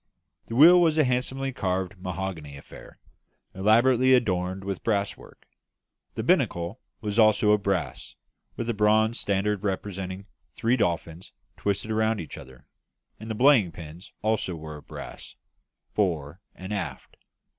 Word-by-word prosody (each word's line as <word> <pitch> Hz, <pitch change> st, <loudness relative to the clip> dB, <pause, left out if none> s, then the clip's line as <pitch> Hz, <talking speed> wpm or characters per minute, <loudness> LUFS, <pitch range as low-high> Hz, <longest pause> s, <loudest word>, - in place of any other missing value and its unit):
The 115 Hz, -, -5 dB
wheel 170 Hz, +7 st, +8 dB
was 160 Hz, -2 st, +3 dB
a 155 Hz, -, +5 dB
handsomely 130 Hz, +1 st, -1 dB
carved 95 Hz, -2 st, -2 dB
mahogany 90 Hz, -6 st, -5 dB
affair, 70 Hz, -, -14 dB, 0.6 s
elaborately 120 Hz, +6 st, +4 dB
adorned 95 Hz, -5 st, -1 dB
with 100 Hz, -1 st, -4 dB
brasswork; 100 Hz, -3 st, -3 dB, 0.7 s
the -, -, -3 dB
binnacle 85 Hz, +7 st, +1 dB, 0.2 s
also 110 Hz, 0 st, +3 dB
was 105 Hz, -, +7 dB
of 105 Hz, -, -4 dB
brass, 95 Hz, -6 st, -3 dB, 0.4 s
with 115 Hz, -, -4 dB
a 120 Hz, -, 0 dB
bronze 110 Hz, +2 st, +2 dB
standard 100 Hz, 0 st, -1 dB
representing 95 Hz, -1 st, -4 dB, 0.3 s
three 120 Hz, +2 st, +1 dB
dolphins 85 Hz, -4 st, -2 dB, 0.2 s
twisted 100 Hz, +2 st, -2 dB
round 110 Hz, 0 st, +1 dB
each 80 Hz, -, -7 dB
other; 65 Hz, -1 st, -14 dB, 0.5 s
and 110 Hz, +2 st, -9 dB
the 110 Hz, -, -2 dB
belaying 120 Hz, -, +5 dB
pins 85 Hz, +2 st, -11 dB
also 110 Hz, -5 st, 0 dB
were 80 Hz, -1 st, -8 dB
of 75 Hz, -, -16 dB
brass, -, -, -9 dB, 0.6 s
fore 85 Hz, -4 st, -1 dB
and 95 Hz, +3 st, -7 dB
aft. 80 Hz, -10 st, -5 dB
100 Hz, 135 wpm, -26 LUFS, 90-110 Hz, 0.7 s, wheel